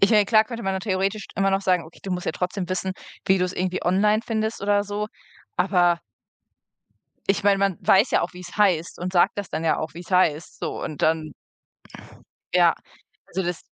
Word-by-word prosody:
...ich 195 - +5
meine, 210 -2 +5
klar 215 0 +5
könnte 235 0 -7
man 195 - -1
nur 190 - -2
theoretisch 195 +1 -1
immer 195 0 +2
noch 195 0 +1
sagen: 180 -3 +2
„Okay, 160 - -16
du 195 - -6
musst 180 -1 -3
jetzt - - -2
trotzdem 180 0 -2
wissen, 185 0 -2 0.3
wie 190 -1 +4
du's 180 0 0
irgendwie 185 0 -2
online 210 +4 +3
findest“ 220 -1 -2
oder 205 0 +2
so, 205 +1 -3 0.5
aber 180 -2 +3 1.3
ich 195 0 +1
meine, 200 -1 +4
man 195 -3 +1
weiß 200 +6 +4
ja - - +3
auch, - - -3
wie's 180 +2 -10
heißt 180 -6 +2
und 180 +1 -4
sagt 175 +2 +3
das 200 -3 -4
dann 155 +1 -3
ja 160 - +2
auch, 155 0 -4
wie's 175 +3 -10
heißt, 165 -4 +1
so - - -4
und 150 - -5
dann 155 -2 +1 1.2
Ja, - - +5 0.5
also, 190 +1 -3
das 175 -1 -3
190 Hz, 200 wpm, -24 LUFS, 175-205 Hz, 1.3 s, ich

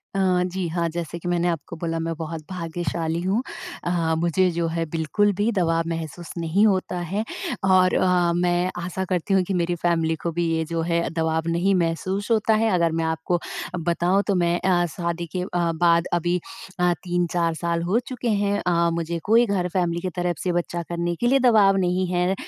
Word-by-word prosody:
अ, - - +1 0.2
जी 180 0 -2
हाँ, 170 0 -1
जैसे 170 0 -5
कि 175 - -7
मैंने 175 0 +1
आपको 165 -3 -3
बोला 165 0 -2
मैं 165 0 -2
बहुत 160 0 -5
भाग्यशाली 170 -1 -3
हूँ। 195 +6 +1 0.4
अ, 170 -2 0
मुझे 175 +2 +2
जो 170 0 -1
है 165 0 -1
बिल्कुल 165 +6 +1
भी 205 +4 +1
दबाव 165 -5 +1
महसूस 165 +1 -5
नहीं 170 +5 +2
होता 185 -2 0
है। 195 +5 -2 0.4
और 185 -1 +4
अ, 180 -2 +3
मैं 175 0 +1
आशा 180 +2 -3
करती 185 +1 0
हूँ 190 -1 +4
कि 195 - -1
मेरी 175 -1 0
फैमिली 165 -2 +1
को 170 - -2
भी 170 +1 -1
ये 160 - 0
जो 165 +1 -2
है 170 0 0
दबाव 160 0 0
नहीं 175 +4 +2
महसूस 185 +4 -1
होता 220 0 +3
है। 225 +1 +2
अगर 170 -2 +2
मैं 165 - 0
आपको 160 +2 -1 0.4
बताऊँ 175 +4 +1
तो 200 - +2
मैं 175 0 +1
अ, 175 -2 +2
शादी 170 0 -2
के 180 - 0
अ, 180 - -3
बाद 170 0 +2
अभी 175 +1 +1 0.4
अ, 180 0 +3
3-4 175 -2 0
साल 170 +1 -1
हो 195 +7 +2
चुके 250 -2 -3
हैं, 205 -1 +1
अ, 170 -1 +3
मुझे 170 0 -2
कोई 230 +3 +5
घर, 195 -4 0
फैमिली 175 -2 0
की 185 - -2
तरफ 175 -1 -1
से 180 - 0
बच्चा 175 0 -2
करने 170 0 -1
के 240 - 0
लिए 270 +2 +4
दबाव 215 -6 +5
नहीं 185 0 +1
है। 180 +1 +2
175 Hz, 200 wpm, -23 LUFS, 170-185 Hz, 0.4 s, कोई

